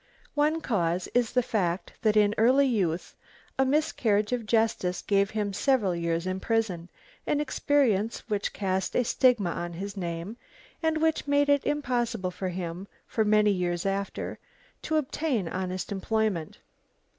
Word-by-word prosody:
One 300 Hz, +2 st, +1 dB
cause 180 Hz, -, 0 dB
is 245 Hz, -2 st, +1 dB
the 250 Hz, -1 st, +3 dB
fact 190 Hz, -6 st, -1 dB
that 215 Hz, -1 st, +3 dB
in 210 Hz, -1 st, +4 dB
early 260 Hz, +5 st, +5 dB
youth 185 Hz, -10 st, -1 dB, 0.4 s
a 265 Hz, -, +5 dB
miscarriage 250 Hz, -8 st, +1 dB
of 235 Hz, -3 st, -2 dB
justice 220 Hz, -5 st, +1 dB
gave 200 Hz, -1 st, +2 dB
him 210 Hz, -2 st, -2 dB
several 215 Hz, -6 st, +2 dB
years 170 Hz, 0 st, -1 dB
in 185 Hz, 0 st, -2 dB
prison, 190 Hz, -6 st, -1 dB, 0.4 s
an 290 Hz, -, +1 dB
experience 260 Hz, -7 st, +1 dB
which 205 Hz, -2 st, -1 dB
cast 190 Hz, -2 st, -2 dB
a 250 Hz, -, +3 dB
stigma 235 Hz, -7 st, +3 dB
on 175 Hz, +1 st, -4 dB
his 200 Hz, +4 st, -6 dB
name 175 Hz, +3 st, -4 dB, 0.4 s
and 320 Hz, -1 st, +1 dB
which 320 Hz, -2 st, +1 dB
made 285 Hz, 0 st, +3 dB
it 285 Hz, -1 st, +3 dB
impossible 240 Hz, -9 st, -1 dB
for 185 Hz, +1 st, -4 dB
him, 180 Hz, +1 st, -5 dB, 0.2 s
for 220 Hz, -, 0 dB
many 210 Hz, 0 st, +4 dB
years 175 Hz, -2 st, -1 dB
after, 195 Hz, 0 st, -3 dB, 0.4 s
to 315 Hz, -, -2 dB
obtain 275 Hz, -, -1 dB
honest 185 Hz, +2 st, -4 dB
employment. 200 Hz, -4 st, -1 dB
210 Hz, 150 wpm, -27 LUFS, 185-250 Hz, 0.4 s, early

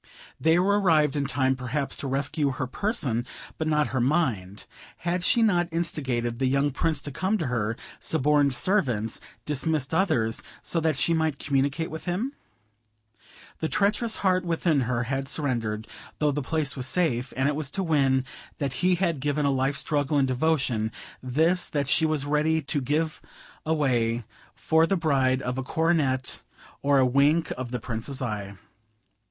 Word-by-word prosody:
They 160 Hz, +1 st, +4 dB
were 200 Hz, +3 st, +3 dB
arrived 155 Hz, -6 st, +3 dB
in 140 Hz, -1 st, 0 dB
time 130 Hz, -1 st, +1 dB
perhaps 130 Hz, +2 st, -3 dB
to 140 Hz, -, -4 dB
rescue 140 Hz, +1 st, 0 dB
her 130 Hz, -, -3 dB
person, 130 Hz, -, -1 dB, 0.4 s
but 160 Hz, -, -1 dB
not 150 Hz, -1 st, +2 dB
her 130 Hz, -, +1 dB
mind; 120 Hz, -, 0 dB, 0.3 s
had 175 Hz, +1 st, -2 dB
she 235 Hz, +4 st, +4 dB
not 175 Hz, -5 st, +3 dB
instigated 130 Hz, -8 st, -2 dB
the 135 Hz, -, +2 dB
young 140 Hz, +2 st, +2 dB
Prince 155 Hz, +1 st, -1 dB
to 145 Hz, -, -5 dB
come 190 Hz, +9 st, 0 dB
to 165 Hz, -, -2 dB
her; 115 Hz, -3 st, -1 dB, 0.2 s
suborned 145 Hz, -2 st, +2 dB
servants, 120 Hz, -, +1 dB, 0.2 s
dismissed 150 Hz, 0 st, -1 dB
others, 155 Hz, -, +1 dB, 0.2 s
so 170 Hz, -, 0 dB
that 160 Hz, -2 st, +1 dB
she 140 Hz, +6 st, +2 dB
might 160 Hz, -3 st, 0 dB
communicate 140 Hz, +4 st, 0 dB
with 160 Hz, -, -7 dB
him? 205 Hz, +11 st, -2 dB, 1.3 s
The 160 Hz, -, -1 dB
treacherous 215 Hz, +3 st, +1 dB
heart 185 Hz, -2 st, +2 dB
within 165 Hz, -4 st, +1 dB
her 120 Hz, -1 st, 0 dB
had 135 Hz, +2 st, -2 dB
surrendered, 115 Hz, -8 st, -1 dB, 0.3 s
though 150 Hz, -1 st, +2 dB
the 145 Hz, +1 st, -2 dB
place 155 Hz, +1 st, -1 dB
was 130 Hz, -2 st, -3 dB
safe; 130 Hz, -6 st, +1 dB
and 130 Hz, +1 st, +2 dB
it 145 Hz, -, 0 dB
was 150 Hz, -3 st, -2 dB
to 195 Hz, -, -2 dB
win 135 Hz, -6 st, +2 dB
this -, -, -14 dB, 0.3 s
that 140 Hz, -3 st, -2 dB
he 180 Hz, +5 st, +3 dB
had 170 Hz, -4 st, 0 dB
given 145 Hz, +2 st, 0 dB
a 140 Hz, -, +3 dB
life's 135 Hz, +2 st, +1 dB
struggle 145 Hz, -1 st, 0 dB
and 135 Hz, -1 st, +3 dB
devotion; 130 Hz, -5 st, +1 dB, 0.3 s
this, 160 Hz, +8 st, +1 dB
that 145 Hz, -2 st, -1 dB
she 160 Hz, +3 st, +3 dB
was 155 Hz, -3 st, 0 dB
ready 150 Hz, +2 st, +2 dB
to 145 Hz, -1 st, -2 dB
give 155 Hz, +4 st, -1 dB, 0.5 s
away 120 Hz, -7 st, +1 dB, 0.3 s
for 160 Hz, 0 st, +3 dB
the 195 Hz, -, +1 dB
bribe 135 Hz, -5 st, +1 dB
of 125 Hz, +1 st, -2 dB
a -, -, -2 dB
coronet 145 Hz, -4 st, 0 dB, 0.4 s
or 140 Hz, 0 st, +3 dB
a 130 Hz, -, +5 dB
wink 140 Hz, +6 st, +3 dB
of 130 Hz, -1 st, -5 dB
the 125 Hz, 0 st, -3 dB
Prince's 115 Hz, +4 st, -4 dB
eye. 105 Hz, -5 st, -4 dB
145 Hz, 170 wpm, -26 LUFS, 130-160 Hz, 1.3 s, a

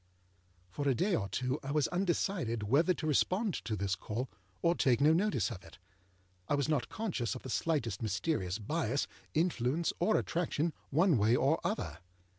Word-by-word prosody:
For 145 Hz, +9 st, -2 dB
a 130 Hz, -, +3 dB
day 185 Hz, -, +1 dB
or 100 Hz, -7 st, -2 dB
two 130 Hz, +7 st, -1 dB
I 135 Hz, -, -7 dB
was 150 Hz, 0 st, +2 dB
undecided 175 Hz, -, 0 dB
whether 140 Hz, -, +3 dB
to 175 Hz, -, -2 dB
respond 185 Hz, -, +2 dB
to 110 Hz, -, -1 dB
this 100 Hz, -1 st, -1 dB
call, 110 Hz, +8 st, -4 dB, 0.3 s
or 170 Hz, -, +4 dB
take 125 Hz, -8 st, +2 dB
no 150 Hz, +3 st, +5 dB
notice 195 Hz, -5 st, +1 dB
of 95 Hz, -5 st, -8 dB
it. 80 Hz, -, -14 dB, 0.7 s
I -, -, +2 dB
was 140 Hz, -1 st, 0 dB
not 150 Hz, -5 st, 0 dB
conscious 170 Hz, -, -2 dB
of -, -, -8 dB
the 130 Hz, -, -6 dB
slightest 120 Hz, -12 st, 0 dB
mysterious 105 Hz, -, -1 dB
bias, 135 Hz, +3 st, -1 dB, 0.3 s
influence, 160 Hz, -1 st, +1 dB
or 215 Hz, +5 st, +3 dB
attraction, 165 Hz, -2 st, -1 dB, 0.2 s
one 160 Hz, -, +4 dB
way 110 Hz, +3 st, +4 dB
or 140 Hz, +6 st, +2 dB
other. 200 Hz, -, -2 dB
145 Hz, 175 wpm, -33 LUFS, 115-170 Hz, 0.7 s, no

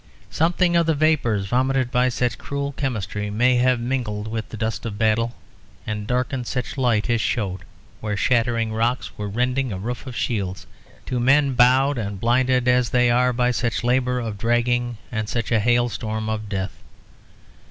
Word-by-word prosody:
Something 175 Hz, +2 st, +2 dB
of 170 Hz, -1 st, +3 dB
the 160 Hz, -, +2 dB
vapours 140 Hz, -10 st, +2 dB
vomited 130 Hz, +3 st, +1 dB
by 125 Hz, +1 st, +3 dB
such 125 Hz, -1 st, -1 dB
cruel 140 Hz, 0 st, -3 dB
chemistry 105 Hz, -7 st, -3 dB
may 125 Hz, +4 st, +3 dB
have 125 Hz, 0 st, +3 dB
mingled 120 Hz, -4 st, -2 dB
with 110 Hz, 0 st, -4 dB
the 115 Hz, -, -7 dB
dust 110 Hz, +1 st, -2 dB
of 110 Hz, -3 st, -5 dB
battle, 115 Hz, +2 st, +1 dB, 0.5 s
and 105 Hz, -1 st, -4 dB
darkened 125 Hz, 0 st, -1 dB
such 125 Hz, -1 st, -3 dB
light 120 Hz, -6 st, +1 dB
as 120 Hz, -2 st, +1 dB
showed 95 Hz, -6 st, -1 dB, 0.4 s
where 105 Hz, -1 st, -3 dB
shattering 115 Hz, -1 st, +1 dB
rocks 115 Hz, +3 st, -1 dB
were 105 Hz, -1 st, -4 dB
rending 125 Hz, +4 st, 0 dB
a 95 Hz, -, -3 dB
roof 120 Hz, +7 st, -5 dB
of 125 Hz, -, -7 dB
shields, 95 Hz, -7 st, -2 dB, 0.4 s
to 125 Hz, -, -2 dB
men 135 Hz, +2 st, +3 dB
bowed 130 Hz, +2 st, +4 dB
and 100 Hz, -3 st, -4 dB
blinded 125 Hz, +2 st, +2 dB
as 125 Hz, -1 st, +3 dB
they 125 Hz, -1 st, +3 dB
are 125 Hz, +1 st, +3 dB
by 125 Hz, 0 st, +1 dB
such 120 Hz, -1 st, -1 dB
labour 125 Hz, +1 st, +1 dB
of 110 Hz, -4 st, -5 dB
dragging 120 Hz, +1 st, +1 dB
and 110 Hz, -2 st, -3 dB
such 115 Hz, -1 st, -2 dB
a 115 Hz, -, +4 dB
hailstorm 110 Hz, -1 st, 0 dB
of 110 Hz, -1 st, -3 dB
death. 95 Hz, -2 st, -3 dB
120 Hz, 175 wpm, -22 LUFS, 110-125 Hz, 0.5 s, bowed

